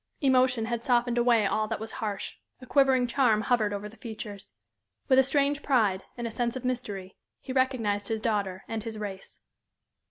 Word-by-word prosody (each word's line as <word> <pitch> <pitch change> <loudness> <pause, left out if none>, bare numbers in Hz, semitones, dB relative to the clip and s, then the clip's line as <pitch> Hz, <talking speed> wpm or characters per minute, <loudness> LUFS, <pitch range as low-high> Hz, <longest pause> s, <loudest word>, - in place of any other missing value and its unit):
Emotion 255 -4 +3
had 235 0 -2
softened 240 0 +2
away 235 -3 +4
all 215 +2 +1
that 225 -1 -3
was 220 +1 -6
harsh; 210 -3 -3 0.3
a 255 - -11
quivering 265 -2 +4
charm 240 -3 +2
hovered 220 -3 +1
over 205 0 -4
the 220 +2 -14
features. 215 -3 -8 0.5
With 260 -1 +5
a - - +7
strange 285 +1 +1
pride, 215 -10 +2
and 240 - -4
a 230 - -3
sense 235 +1 -1
of 260 -1 -5
mystery, 205 -7 -4 0.2
he 260 - -6
recognized 230 -6 +1
his 220 -1 -1
daughter 200 -4 -1
and 225 -1 -3
his 225 0 -6
race. 200 -2 -7
230 Hz, 185 wpm, -28 LUFS, 210-255 Hz, 0.5 s, a